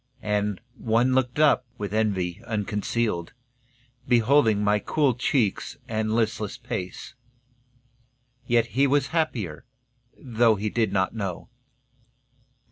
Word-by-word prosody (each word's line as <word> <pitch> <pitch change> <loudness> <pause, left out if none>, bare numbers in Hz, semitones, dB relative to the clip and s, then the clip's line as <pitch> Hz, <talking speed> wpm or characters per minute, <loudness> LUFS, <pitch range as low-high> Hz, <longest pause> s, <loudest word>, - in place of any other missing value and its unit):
And 105 -2 -1 0.2
one 120 +3 +2
looked 130 -1 +1
up, 150 -4 +4
with 100 -1 -5
envy 100 -4 0
unconcealed, 105 -3 -2 0.7
Beholding 120 -3 +4
my 105 0 +3
cool 140 +5 +1
cheeks 120 -3 0
and 110 -2 -1
listless 110 0 -1
pace, 110 -6 -6 1.3
Yet 120 -1 +3
he 135 +3 +3
was 140 0 +1
happier, 115 - -1 0.5
though 115 -3 +2
he 105 +1 -3
did 115 -2 +1
not 95 -1 0
know. 100 -5 -5
110 Hz, 110 wpm, -25 LUFS, 105-125 Hz, 1.3 s, up